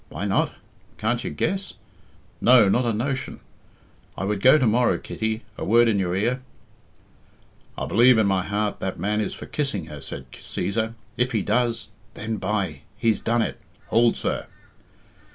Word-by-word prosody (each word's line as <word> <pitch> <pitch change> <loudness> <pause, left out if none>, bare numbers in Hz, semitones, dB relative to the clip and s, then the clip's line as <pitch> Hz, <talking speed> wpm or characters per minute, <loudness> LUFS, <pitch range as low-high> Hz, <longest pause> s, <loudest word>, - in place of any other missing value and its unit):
Why - - -4
not? - - +1 0.5
Can't 120 +2 -1
you - - -3
guess? 195 0 -2 0.7
No? 120 -4 +7
Not 120 +6 +2
a 115 - +2
notion? 130 +4 -2 0.8
I - - -3
would 100 0 -1
go 130 +6 +7
to 135 - +2
morrow 120 +2 +3
Kitty, 110 +1 -3 0.2
a - - -3
word 120 +3 +5
in 105 -3 +2
your 90 -2 0
ear 120 +6 0 0.7
" - - -33
"I - - -2
believe 120 +2 +5
in 110 - +4
my 95 -2 +2
heart 105 +2 -2
that 95 - -3
man 105 +1 0
is - - -3
for - - -8
kissing 135 - -1
her," 75 - -8
said 65 -1 -8
Cæsar. 110 +3 -3 0.2
"If 125 +1 +1
he 110 -4 +1
does, 120 -2 0 0.2
then 110 +1 -3
by 95 -9 -2 0.2
he's 110 -3 +2
done 115 0 +1
it! - - -5 0.3
Hould, 115 +1 +4
sir." - - -2
110 Hz, 170 wpm, -24 LUFS, 100-120 Hz, 0.8 s, No